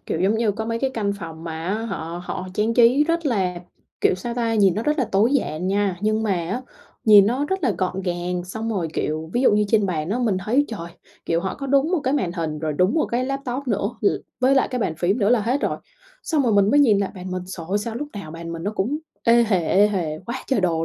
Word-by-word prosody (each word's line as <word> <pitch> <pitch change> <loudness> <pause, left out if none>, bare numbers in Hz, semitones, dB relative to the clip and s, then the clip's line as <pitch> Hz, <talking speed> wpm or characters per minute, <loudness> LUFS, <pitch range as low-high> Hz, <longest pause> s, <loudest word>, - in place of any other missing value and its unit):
kiểu, 160 - -2
giống 195 +4 +3
như 220 -3 +1
có 220 +2 -4
mấy 230 0 -2
cái 265 +1 0
căn 205 -3 0
phòng 165 -2 -8
mà 160 0 -5
á 195 - 0
họ 175 -4 -5
họ 185 +1 -5
trang 220 +3 +1
trí 250 +4 +5
rất 335 0 0
là, 190 -8 0 0.5
kiểu, - - +3
sao 235 +6 -5
ta, 235 -2 0
hhìn 200 -5 +3
nó 215 - -2
rất 300 +4 0
là 265 - +3
tối 215 +7 +3
giản 180 - -1
nha. 195 -1 +1
Nhưng 215 +1 +1
mà 215 - 0 0.2
á 250 +2 -2 0.4
nhìn 205 -2 +8
nó 255 +6 0
rất 380 +3 -2
là 250 - +2
gọn 185 0 -1
gàng, 175 0 -2
xong 220 +5 -4
rồi, 180 -6 -1
kiểu, 155 +1 -2
ví 245 - +1
dụ 255 - +5
như 210 0 +3
trên 210 -2 +3
bàn 160 -2 -2
á 235 - 0
mình 220 -6 +1
thấy 265 +7 +3
trời, 185 -7 -6 0.4
kiểu, 165 0 +1
họ 190 0 -3
có 275 - -6
đúng 280 +4 +2
một 355 - +2
cái 270 0 0
màn 185 -12 0
hình 160 -3 -3
rồi 155 0 -2
đúng 180 +7 +2
một 315 - +2
cái 245 +2 -1
laptop 275 -1 -3
nữa 205 0 0
l 205 - 0 0.3
với 260 +2 +4
lại 270 - +3
cái 250 - -3
bàn 200 -8 -1
phím 195 +7 +1
nữa 200 - +2
là 240 -1 +4
hết 245 +7 0
rồi. - - -1 0.5
Xong 310 -4 +1
rồi 235 -4 +2
mình 200 0 +4
mới 290 +1 +5
nhìn 215 -8 +5
lại 200 - -1
bàn 185 0 -7
mình, 185 0 -3
trời 175 -3 -7
ơi, 200 - +1
sao 220 +2 -4
lúc 290 +5 -4
nào 200 -7 -7
bàn 165 +1 -7
mình 165 0 -6
nó 205 - -1
cũng 230 +9 -1 0.3
ê 235 +1 +6
hề, 180 -6 +1
ê 205 +2 +5
hề 165 -7 -2
quá 250 +2 -5
trời 265 -6 +1
đồ 165 -3 +1
210 Hz, 275 wpm, -22 LUFS, 180-245 Hz, 0.5 s, nhìn